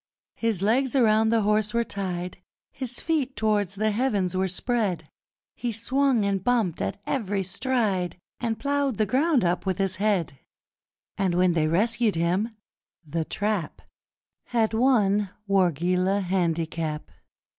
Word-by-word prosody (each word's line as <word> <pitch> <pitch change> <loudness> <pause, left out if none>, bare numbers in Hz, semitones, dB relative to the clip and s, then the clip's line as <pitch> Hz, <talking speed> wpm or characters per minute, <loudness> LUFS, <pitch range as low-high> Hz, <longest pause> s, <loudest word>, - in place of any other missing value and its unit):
His 220 -5 -1
legs 255 +6 +2
around 220 -3 +4
the 225 -1 +2
horse 210 +1 +1
were 235 - +3
tied, 180 -4 -4 0.3
His 255 -2 -4
feet 290 -5 -1
towards 205 -3 0
the 215 +2 +1
heavens 205 -6 0
were 190 +1 +1
spread, 205 -1 -1 0.5
He 240 - -3
swung 245 +1 +1
and 195 -2 0
bumped 225 -8 +1
at 95 - -3
every 205 -7 -1
stride 195 -3 0 0.2
And 230 -2 -1
ploughed 280 -4 0
the 215 - +2
ground 265 - +2
up 180 +2 0
with 185 -2 0
his 195 -2 0
head! 190 -9 0 0.8
And 185 -3 +1
when 180 0 +4
they 160 -2 +1
rescued 220 +5 +1
him, 175 +7 +1 0.6
The 160 +2 -2
Trap 205 -5 -2 0.6
Had 225 -2 0
won 210 -5 +3 0.2
Wargeilah 185 +1 +2
Handicap! 165 -4 -2
205 Hz, 135 wpm, -25 LUFS, 180-235 Hz, 0.8 s, around